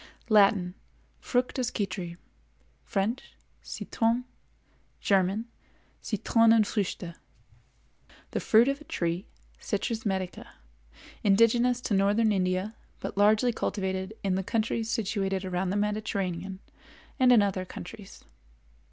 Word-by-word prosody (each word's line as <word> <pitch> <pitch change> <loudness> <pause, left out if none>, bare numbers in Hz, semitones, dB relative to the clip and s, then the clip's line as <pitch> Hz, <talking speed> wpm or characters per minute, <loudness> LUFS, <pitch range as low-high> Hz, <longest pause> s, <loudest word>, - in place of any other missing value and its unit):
Latin—Fructus 215 +5 +1
Citri; 185 -4 -4 0.7
French—Citron; 230 +2 -2 0.7
German—Citronenfrüchte. 210 0 0 1.2
The - - -1
fruit 230 +3 +5
of 275 +1 -1
a - - -12
tree, 170 - -2 0.3
Citrus 220 +2 -2
medica, 190 -3 -3 0.7
indigenous 235 +4 +4
to 225 - -2
northern 205 +3 +3
India, 185 +2 0 0.3
but - - -5
largely 215 +4 +4
cultivated 190 -1 -2
in 195 -2 +1
the 190 - 0
countries 225 +2 -1
situated 195 -4 -1
around 185 0 -1
the 200 - 0
Mediterranean 195 -3 -2 0.6
and 255 -1 +6
in 230 -4 +7
other 195 -2 -1
countries. 190 +2 -10
205 Hz, 90 wpm, -28 LUFS, 190-230 Hz, 1.2 s, in